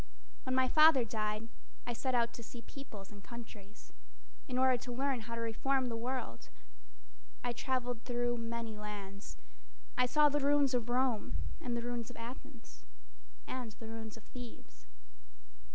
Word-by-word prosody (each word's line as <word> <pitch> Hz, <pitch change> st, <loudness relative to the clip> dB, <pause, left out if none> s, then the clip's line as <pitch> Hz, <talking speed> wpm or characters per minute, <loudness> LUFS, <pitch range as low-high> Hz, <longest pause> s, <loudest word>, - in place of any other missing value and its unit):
When 255 Hz, -, +1 dB
my 260 Hz, 0 st, +5 dB
father 305 Hz, -4 st, +8 dB
died, 215 Hz, 0 st, -1 dB, 0.4 s
I 240 Hz, -, -1 dB
set 255 Hz, +2 st, 0 dB
out 235 Hz, -1 st, +3 dB
to -, -, -7 dB
see 235 Hz, +1 st, -9 dB
peoples 215 Hz, -9 st, -9 dB
and 205 Hz, -1 st, -11 dB
countries 220 Hz, -3 st, -10 dB, 0.5 s
In 250 Hz, -, -1 dB
order 260 Hz, 0 st, +6 dB
to 245 Hz, +1 st, -6 dB
learn 265 Hz, +1 st, +1 dB
how 230 Hz, -, -2 dB
to 230 Hz, -, -2 dB
reform 255 Hz, +3 st, +1 dB
the 230 Hz, -, -2 dB
world. 235 Hz, -, -3 dB, 0.9 s
I 245 Hz, -, +1 dB
traveled 245 Hz, -2 st, -1 dB
through 240 Hz, -1 st, +1 dB
many 230 Hz, -1 st, -3 dB
lands. 200 Hz, -, -6 dB, 0.6 s
I 250 Hz, -, +6 dB
saw 300 Hz, +3 st, +6 dB
the 295 Hz, 0 st, +3 dB
ruins 285 Hz, -1 st, +4 dB
of 240 Hz, -1 st, +1 dB
Rome 245 Hz, -3 st, +2 dB, 0.3 s
And 240 Hz, -1 st, -1 dB
the 235 Hz, -, -2 dB
ruins 240 Hz, -1 st, -2 dB
of 245 Hz, -, -10 dB
Athens, 240 Hz, +1 st, -9 dB, 0.6 s
And 245 Hz, -4 st, -4 dB
the 225 Hz, -, -10 dB
ruins 225 Hz, -1 st, -6 dB
of 225 Hz, -, -13 dB
Thebes. -, -, -10 dB
240 Hz, 160 wpm, -35 LUFS, 225-255 Hz, 0.9 s, father